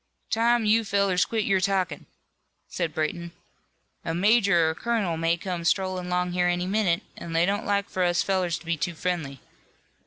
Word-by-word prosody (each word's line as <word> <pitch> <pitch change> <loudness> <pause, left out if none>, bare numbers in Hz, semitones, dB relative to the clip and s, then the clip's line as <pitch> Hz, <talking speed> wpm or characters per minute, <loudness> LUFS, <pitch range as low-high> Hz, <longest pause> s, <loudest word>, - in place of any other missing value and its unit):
"Time 235 0 +2
you 220 +2 +3
fellers 200 -3 +1
quit 220 -2 -2
your 195 -1 +2
talkin'," 190 -1 -1 0.6
said 170 -3 -3
Brayton, 170 +3 -3 0.7
"a 165 - -3
major 200 -3 +4
or - - +2
a - - -4
colonel 210 -2 -1
may 165 +1 +1
come 175 -1 -4
strollin' 185 +1 0
'long 180 0 0
here 180 0 +1
any 175 0 0
minute, 190 -3 +1
an' 170 - -7
they 165 +1 +3
don't 200 +2 -1
like 200 0 0
for 185 - -3
us 175 -1 +2
fellers 185 -3 0
to 170 - -15
be 165 0 0
too 170 +3 -3
friendly. 160 -6 -3
180 Hz, 185 wpm, -26 LUFS, 170-200 Hz, 0.7 s, major